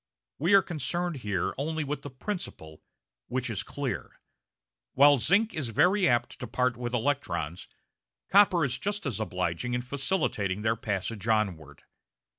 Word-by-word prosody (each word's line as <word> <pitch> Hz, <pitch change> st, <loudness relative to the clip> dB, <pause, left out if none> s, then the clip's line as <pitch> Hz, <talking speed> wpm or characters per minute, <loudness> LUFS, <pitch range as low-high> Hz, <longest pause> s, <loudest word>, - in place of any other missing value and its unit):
We 175 Hz, +7 st, +4 dB
are 195 Hz, -, +6 dB
concerned 175 Hz, +1 st, -2 dB
here 100 Hz, -7 st, -2 dB
only 155 Hz, +2 st, -1 dB
with 145 Hz, 0 st, -3 dB
the 145 Hz, -, -7 dB
principle, 130 Hz, -, -6 dB, 0.5 s
which 125 Hz, -1 st, -2 dB
is 100 Hz, -, -2 dB
clear. 135 Hz, -7 st, -5 dB, 0.7 s
While 145 Hz, +1 st, +6 dB
zinc 195 Hz, -, +3 dB
is 145 Hz, -7 st, -2 dB
very 180 Hz, -, +3 dB
apt 120 Hz, -1 st, 0 dB
to 125 Hz, -, -5 dB
part 125 Hz, +2 st, 0 dB
with 120 Hz, 0 st, -3 dB
electrons, 90 Hz, -, -2 dB, 0.6 s
copper 190 Hz, -5 st, +5 dB
is 130 Hz, -1 st, -2 dB
just 205 Hz, -1 st, -2 dB
as 125 Hz, -6 st, -2 dB
obliging 90 Hz, +3 st, -2 dB
in 125 Hz, -, -2 dB
facilitating 130 Hz, -, -1 dB
their 110 Hz, +1 st, +2 dB
passage 105 Hz, 0 st, -3 dB
onward. 90 Hz, -10 st, -1 dB
125 Hz, 145 wpm, -28 LUFS, 105-155 Hz, 0.7 s, are